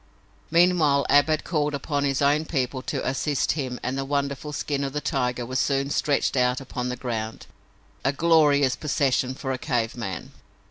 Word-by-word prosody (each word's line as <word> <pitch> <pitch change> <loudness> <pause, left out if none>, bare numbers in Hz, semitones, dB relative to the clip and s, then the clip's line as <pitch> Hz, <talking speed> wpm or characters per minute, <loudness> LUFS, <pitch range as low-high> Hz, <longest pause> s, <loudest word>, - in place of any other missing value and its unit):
Meanwhile 165 -4 +4
Ab 145 +1 +6
had 155 -1 0
called 150 -3 0
upon 145 0 -1
his 135 0 0
own 145 +3 +3
people 130 -4 -2
to - - -3
assist 140 +2 0
him 130 -5 -3
and 130 +2 -2
the - - -1
wonderful 140 +1 -2
skin 145 -1 -2
of 135 -1 -3
the 150 - -1
tiger 125 -4 -1
was 130 +2 -2
soon 140 0 0
stretched 145 -2 +1
out 125 -1 +2
upon 125 -2 -4
the 125 - -2
ground, 115 -3 -4 0.6
a 135 - +2
glorious 145 -3 +4
possession 135 -4 0
for 135 -1 -4
a 130 - -3
cave 120 -5 -1
man. 110 -6 -5
140 Hz, 180 wpm, -25 LUFS, 130-145 Hz, 0.6 s, Ab